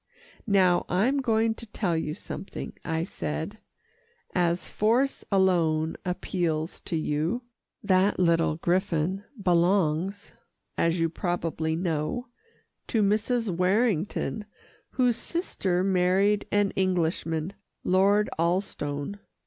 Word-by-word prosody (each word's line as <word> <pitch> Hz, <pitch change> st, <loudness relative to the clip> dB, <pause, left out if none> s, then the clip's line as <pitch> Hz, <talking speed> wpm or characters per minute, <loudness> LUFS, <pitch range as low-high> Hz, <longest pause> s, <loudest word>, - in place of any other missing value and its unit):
"Now 185 Hz, -4 st, +4 dB
I'm 235 Hz, +11 st, +2 dB
going 225 Hz, -2 st, +2 dB
to 230 Hz, +1 st, -10 dB
tell 195 Hz, -5 st, -1 dB
you 155 Hz, -1 st, -2 dB
something," 195 Hz, -, -7 dB
I 160 Hz, 0 st, -1 dB
said, 75 Hz, -, -4 dB, 0.7 s
"as 175 Hz, 0 st, +1 dB
force 240 Hz, +6 st, +1 dB
alone 165 Hz, -5 st, +2 dB
appeals 175 Hz, -3 st, -2 dB
to 170 Hz, -, -2 dB
you. 160 Hz, +9 st, -1 dB, 0.4 s
That 195 Hz, 0 st, +3 dB
little 165 Hz, -3 st, +3 dB
griffon 180 Hz, +2 st, 0 dB, 0.2 s
belongs, 180 Hz, +1 st, +1 dB, 0.4 s
as 165 Hz, +1 st, +1 dB
you 165 Hz, -, +3 dB
probably 165 Hz, -2 st, -2 dB
know, 165 Hz, +7 st, -2 dB, 0.6 s
to 220 Hz, -3 st, +2 dB
Mrs. 215 Hz, 0 st, +1 dB
Warrington 205 Hz, +2 st, +1 dB, 0.4 s
whose 245 Hz, -3 st, +2 dB
sister 190 Hz, -, -1 dB
married 195 Hz, +2 st, +2 dB
an 205 Hz, -1 st, +2 dB
Englishman 170 Hz, -2 st, 0 dB, 0.3 s
Lord 200 Hz, +3 st, +3 dB
Alstone. 170 Hz, -1 st, -1 dB
185 Hz, 100 wpm, -27 LUFS, 165-205 Hz, 0.7 s, Now